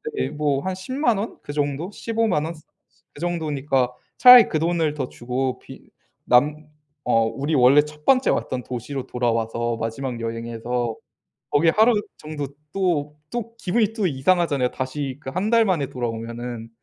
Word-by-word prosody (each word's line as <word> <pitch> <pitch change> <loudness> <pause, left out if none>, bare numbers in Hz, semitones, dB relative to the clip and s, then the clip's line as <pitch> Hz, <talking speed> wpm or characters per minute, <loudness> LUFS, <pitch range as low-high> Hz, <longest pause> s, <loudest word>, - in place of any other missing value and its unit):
네. - - -1
뭐. 145 -2 0
한 190 - -2
100,000 240 +4 0
원. 215 - -5
그 145 - -6
정도? 145 +5 -2
150,000 220 -8 0
원. 165 - -4 0.6
그 145 - -12
정도니까 145 -7 0 0.2
차라리 250 -2 +10
그 155 - 0
돈을 165 -2 +1
더 135 -4 -3
주고 125 +2 -3
비 - - -14 0.3
남 150 +5 +3 0.4
어. 115 -2 +3
우리 135 +8 -2
원래 135 +2 +6
1 150 0 -11
번째 260 -1 +4
왔던 130 - -2
도시로 125 +3 -5
돌아와서 115 -1 -1
마지막 120 +2 -4
여행에서 115 +1 -3 0.6
거기 155 +3 +3
하루 220 +7 +4 0.3
정도 150 -2 -5 0.2
또, 160 -6 -1
또 230 -1 -5
기분이 215 +2 +1
또 215 -4 0
이상하잖아요. 145 -2 +1
다시 130 0 -4
그 135 - -6
1 190 +8 -1
달 230 -1 +5
만에 175 -9 +1
돌아오면은. 115 -1 -5
145 Hz, 270 characters per minute, -23 LUFS, 125-175 Hz, 0.6 s, 차라리